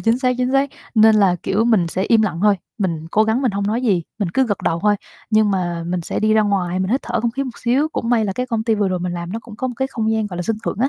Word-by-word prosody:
chính 225 +2 +2
xác 255 -1 +1
chính 250 +1 0
xác, 275 0 +2 0.2
nên 220 -1 +6
là, 195 -4 +4
kiểu, 225 +3 +1
mình 220 -7 +3
sẽ 185 +3 -2
im 220 +2 +3
lặng 195 -6 -1
thôi. 205 -2 +4 0.2
Mình 165 -5 -2
cố 215 - +3
gắng 220 +5 0
mình 250 - +2
hông 200 0 -2
nói 225 +4 -1
gì, 195 -8 +2 0.2
mình 200 -5 -1
cứ 265 -1 +3
gật 205 -4 -1
đầu 165 - +1
thôi, 210 0 +3 0.3
nhưng 215 -1 +4
mà 175 -3 -2
mình 175 +1 -1
sẽ 165 - -3
đi 215 0 +2
ra 215 - +4
ngoài, 185 -3 0
mình 185 +1 -1
hít 260 +4 +1
thở - - -2
không 235 - 0
khí 275 +4 -3
một 250 -3 -8
xíu. 260 +6 +1
Cũng 240 -6 -4
may 230 -3 +3
là 195 - -1
cái 250 +6 -3
công 225 -3 -2
ty 225 -1 +2
vừa 205 -2 +1
rồi 185 -1 -1
mình 180 0 -3
làm 170 0 -5
nó 225 - -3
cũng 220 -3 -12
có 260 - -2
một 245 - -6
cái 265 +1 -1
không 220 -4 -1
gian, 220 -1 0
gọi 185 -4 -7
là, 175 - -2
sân 225 +3 -1
thượng - - -3
á, 260 - +2
215 Hz, 330 wpm, -20 LUFS, 190-235 Hz, 0.3 s, nên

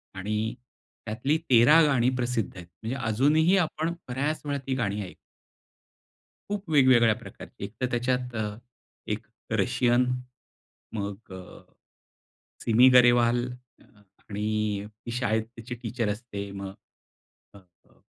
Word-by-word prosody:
आणि 105 +3 -2 0.5
त्यातली 125 +8 0
13 130 +7 +7
गाणी 130 -4 +3
प्रसिद्ध 120 -4 -1
आहेत. 90 -1 -9
म्हणजे 110 +9 -6
अजूनही 150 - +3
आपण 165 -1 0
बऱ्याच 140 +5 -2
वेळा 145 -1 -1
ती 130 - 0
गाणी 105 -4 -1
ऐकू. 90 - -9 1.4
खूप 205 -4 -4
वेगवेगळ्या 125 -6 +5
प्रकारची. - - -11
एकतर 110 +6 -3
त्याच्यात 125 0 -1
अ, 110 - -1 0.6
एक - - -3 0.3
रशियन, 125 0 +2 0.9
मग 100 -1 -5
अ, 95 -1 -11 1.0
सिमी 120 +3 +6
गरेवाल 120 0 +5 0.8
आणि 105 0 -1 0.2
ती 120 - -5
शाळेत 110 -2 0
त्याची 115 +2 -7
टीचर 115 -1 -2
असते 105 -2 -5
मग 100 -1 -6 0.9
हो, - - -12
हो. 90 -2 -30
120 Hz, 115 wpm, -27 LUFS, 105-130 Hz, 1.4 s, 13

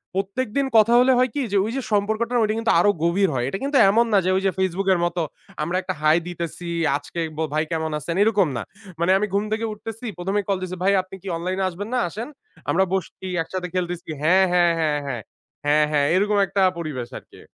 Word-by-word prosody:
প্রত্যেকদিন 210 +7 -1
কথা 220 +2 +5
হলে 255 +1 +5
হয় 255 +1 +3
কি? 290 - 0
যে 200 - +2
ওই 220 - -3
যে - - -1
সম্পর্কটা 220 +4 0
ঐটা 215 0 +1
কিন্তু 225 - +1
আরো 190 - +4
গভীর 185 +3 +2
হয়। 120 -2 -1
এটা 195 - -3
কিন্তু 280 0 +1
এমন 230 +4 +4
না - - +6
যে - - +2
ওই 190 - +1
যে 195 - +3
FaceBook 190 +1 0
এর 175 - 0
মত 175 0 -3 0.5
আমরা 175 +4 -1
একটা 185 - -3
হাই 155 +1 +5
দিতেছি। 170 0 -5 0.3
আজকে 145 +4 -8 0.2
ব - - -6
ভাই 155 0 +2
কেমন 160 -1 -1
আছেন 165 +3 -4
এরকম 205 -4 +3
না। - - -2 0.4
মানে 170 +2 +2
আমি 210 +2 0
ঘুম 200 +1 +2
থেকে 220 +1 -1
উঠতেছি 225 +2 -8
১ম 180 +2 -3
এই 205 - -4
কল 195 - +2
দিছি 185 0 -4
ভাই 195 +1 +4
আপনি 185 +1 -12
কি 195 - -11
অনলাইন 180 +3 -3
এ - - +1
আসবেন 190 +4 -6
না? 250 - +2
আসেন। 220 +7 -6 0.4
আমরা 190 - +3
বসছি 190 0 -3 0.2
একসাথে 180 +2 -4
খেলতেছি 175 -2 -3
হ্যাঁ, 185 +5 +5
হ্যাঁ, 175 -1 +4
হ্যাঁ, 150 -2 +1
হ্যাঁ। 125 -4 -3 0.4
হ্যাঁ, 150 +1 +4
হ্যাঁ, 145 -1 +2
এরকম 205 +2 +2
একটা 195 - 0 0.2
পরিবেশ 150 -8 -4
আরকি। - - -15
185 Hz, 225 wpm, -23 LUFS, 170-210 Hz, 0.5 s, না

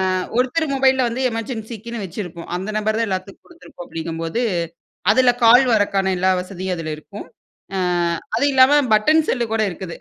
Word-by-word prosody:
ஆ - - +1 0.2
ஒருத்தர் 275 +6 +1
மொபைல்ல 265 -1 +3
வந்து 245 +3 -4
எமர்ஜென்சிக்குன்னு 225 -1 -6
வச்சிருப்போம். 175 -2 -7
அந்த 190 +4 -5
நம்பர் 215 +1 0
தான் 230 - 0
எல்லாத்துக்கும் 190 +1 -5
குடுத்துருப்போம். 335 - -13
அப்டிங்கும்போது 165 +6 -3 0.7
அதுல 255 +2 +4
கால் 245 +3 +7
வரக்கான 195 -2 +1
எல்லா 185 +1 +2
வசதியும் 185 0 -5
அதில 155 -2 -4
இருக்கும். 200 +6 -11 0.5
ஆ - - -1 0.6
அதுவும் 285 +5 +2
இல்லாம 270 +3 +6
பட்டன் 310 +9 +3
செல்லு 240 -3 0
கூட 220 -1 +1
இருக்குது. 175 -1 -7
215 Hz, 155 wpm, -20 LUFS, 185-255 Hz, 0.7 s, கால்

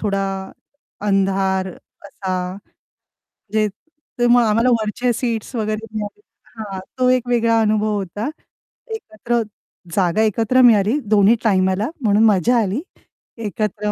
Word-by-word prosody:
थोडा 200 -2 0 0.9
अंधार 195 -1 +1
असा. 185 -1 -6 0.8
म्हणजे 215 +1 -2 0.5
ते 240 - +3
मग 240 0 +6
आम्हाला 230 +3 +3
वरच्या 235 +3 -1
सीट्स 230 +1 -3
वगैरे 215 0 -2
मिळाले. 215 - -5 0.4
हां, 200 -3 -5 0.2
तो 255 - +4
एक 255 -1 +2
वेगळा 230 -1 +3
अनुभव 215 0 +1
होता. 200 - -4 0.7
एकत्र 235 - -2 0.5
जागा 185 +1 +2
एकत्र 225 +4 +2
मिळाली 225 +1 +5 0.2
दोन्ही 205 +3 +5
टाईमला 190 0 +2
म्हणून 215 -2 +3
मज्जा 215 +3 +3
आली. 210 +6 -1 0.6
एकत्र 210 -1 -2
215 Hz, 115 wpm, -20 LUFS, 195-230 Hz, 0.9 s, मग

